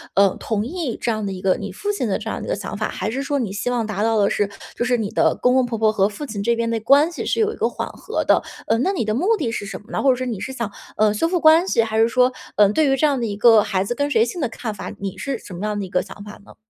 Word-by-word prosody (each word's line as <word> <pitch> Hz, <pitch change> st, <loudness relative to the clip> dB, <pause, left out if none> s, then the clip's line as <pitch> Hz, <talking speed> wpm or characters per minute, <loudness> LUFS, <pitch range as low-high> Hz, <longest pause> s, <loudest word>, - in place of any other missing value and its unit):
嗯， 195 Hz, -1 st, +4 dB
同 215 Hz, -1 st, -2 dB
意 310 Hz, -5 st, -3 dB
这 235 Hz, -, 0 dB
样 215 Hz, -1 st, -2 dB
的 195 Hz, -, -2 dB
一 185 Hz, 0 st, -7 dB
个， 185 Hz, -1 st, +3 dB
你 200 Hz, -1 st, -6 dB
父 410 Hz, -, -3 dB
亲 410 Hz, -, -2 dB
的 -, -, 0 dB
这 -, -, -8 dB
样 -, -, -3 dB
的 -, -, -6 dB
一 -, -, -6 dB
个 -, -, +1 dB
想 -, -, -6 dB
法， -, -, -2 dB
还 215 Hz, -, -3 dB
是 270 Hz, +3 st, -2 dB
说 285 Hz, +1 st, -1 dB
你 230 Hz, -7 st, -2 dB
希 205 Hz, -, -2 dB
望 240 Hz, -2 st, 0 dB
达 210 Hz, -2 st, -3 dB
到 225 Hz, 0 st, +2 dB
的 200 Hz, -1 st, +4 dB
是 205 Hz, -1 st, 0 dB, 0.3 s
就 -, -, -1 dB
是 245 Hz, 0 st, +2 dB
你 220 Hz, -2 st, -3 dB
的 -, -, +2 dB
公 250 Hz, 0 st, +2 dB
公 260 Hz, -, +4 dB
婆 235 Hz, -2 st, -3 dB
婆 220 Hz, 0 st, +3 dB
和 200 Hz, -1 st, +2 dB
父 290 Hz, +8 st, -7 dB
亲 210 Hz, -6 st, -5 dB
这 235 Hz, +3 st, +2 dB
边 230 Hz, 0 st, -1 dB
的 230 Hz, -1 st, -1 dB
关 280 Hz, +8 st, +4 dB
系 340 Hz, -, -5 dB
是 -, -, -1 dB
有 435 Hz, 0 st, +2 dB
一 -, -, -9 dB
个 -, -, 0 dB
缓 -, -, -4 dB
和 -, -, -4 dB
的？ -, -, +3 dB, 0.2 s
呃， 225 Hz, -, +1 dB
那 365 Hz, +10 st, +1 dB
你 330 Hz, -, -1 dB
的 215 Hz, -, 0 dB
目 385 Hz, -, +2 dB
的 250 Hz, -, -2 dB
是 205 Hz, -, -4 dB
什 -, -, -6 dB
么 215 Hz, -, -17 dB
呢？ -, -, -1 dB
或 275 Hz, -, +3 dB
者 255 Hz, -, +5 dB
说 255 Hz, +1 st, -4 dB
你 225 Hz, -6 st, -3 dB
是 265 Hz, -, -5 dB
想， 235 Hz, -5 st, -4 dB, 0.3 s
呃， 215 Hz, -1 st, +3 dB
修 330 Hz, +10 st, +1 dB
复 355 Hz, 0 st, 0 dB
关 320 Hz, +3 st, +6 dB
系？ 230 Hz, -10 st, +3 dB
还 220 Hz, 0 st, -1 dB
是 225 Hz, -, +5 dB
说， 250 Hz, +1 st, +2 dB, 0.2 s
嗯， 205 Hz, -1 st, +5 dB
对 305 Hz, 0 st, +3 dB
于 270 Hz, -, +3 dB
这 305 Hz, -, +3 dB
样 280 Hz, -4 st, +2 dB
的 230 Hz, -, -1 dB
一 205 Hz, -, -3 dB
个 225 Hz, 0 st, +6 dB
孩 195 Hz, -3 st, 0 dB
子 220 Hz, -, -2 dB
跟 285 Hz, +3 st, -1 dB
谁 230 Hz, -4 st, +3 dB
姓 340 Hz, +8 st, -5 dB
的 255 Hz, -, 0 dB
看 225 Hz, -1 st, -5 dB
法， 205 Hz, -, -7 dB
你 195 Hz, -1 st, -4 dB
是 275 Hz, -3 st, -3 dB
什 205 Hz, -, -12 dB
么 180 Hz, +4 st, -6 dB
样 210 Hz, -1 st, -2 dB
的 200 Hz, -, -3 dB
一 185 Hz, -, -10 dB
个 180 Hz, -, +1 dB
想 205 Hz, -, -10 dB
法 210 Hz, 0 st, -11 dB
呢？ -, -, -16 dB
230 Hz, 370 characters per minute, -21 LUFS, 210-270 Hz, 0.3 s, 关